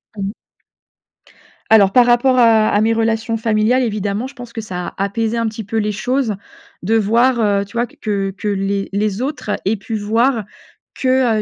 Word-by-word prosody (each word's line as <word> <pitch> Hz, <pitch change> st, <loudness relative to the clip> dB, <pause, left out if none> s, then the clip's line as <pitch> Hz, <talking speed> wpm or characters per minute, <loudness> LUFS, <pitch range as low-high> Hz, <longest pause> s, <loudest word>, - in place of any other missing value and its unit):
Mmh. 195 Hz, -1 st, -3 dB, 1.4 s
Alors 205 Hz, -3 st, +6 dB
par 245 Hz, +3 st, +5 dB
rapport 245 Hz, +2 st, +3 dB
à 225 Hz, -3 st, +5 dB
à 205 Hz, -, +2 dB
mes 225 Hz, +1 st, +2 dB
relations 225 Hz, 0 st, 0 dB
familiales 225 Hz, +3 st, +1 dB
évidemment, 210 Hz, +1 st, -2 dB
je 270 Hz, -, -13 dB
pense 245 Hz, -2 st, -10 dB
que 225 Hz, -, -4 dB
ça 180 Hz, -4 st, -5 dB
a 195 Hz, -, 0 dB
apaisé 220 Hz, +3 st, -1 dB
un 230 Hz, -, 0 dB
petit 220 Hz, -1 st, -6 dB
peu 225 Hz, +3 st, -3 dB
les 210 Hz, -1 st, 0 dB
choses 245 Hz, +1 st, -1 dB, 0.5 s
de 215 Hz, +6 st, 0 dB
voir, 235 Hz, +3 st, +2 dB
heu, 200 Hz, -2 st, +1 dB
tu 200 Hz, -, -18 dB
vois 240 Hz, +1 st, +1 dB
que 200 Hz, -3 st, -3 dB
que -, -, -5 dB
les 195 Hz, 0 st, -1 dB
les 205 Hz, +1 st, -1 dB
autres 270 Hz, -5 st, -3 dB
aient 205 Hz, +3 st, +2 dB
pu 220 Hz, +2 st, -6 dB
voir 225 Hz, +2 st, +1 dB, 0.5 s
que, 255 Hz, -4 st, +2 dB
220 Hz, 185 wpm, -18 LUFS, 205-235 Hz, 1.4 s, Alors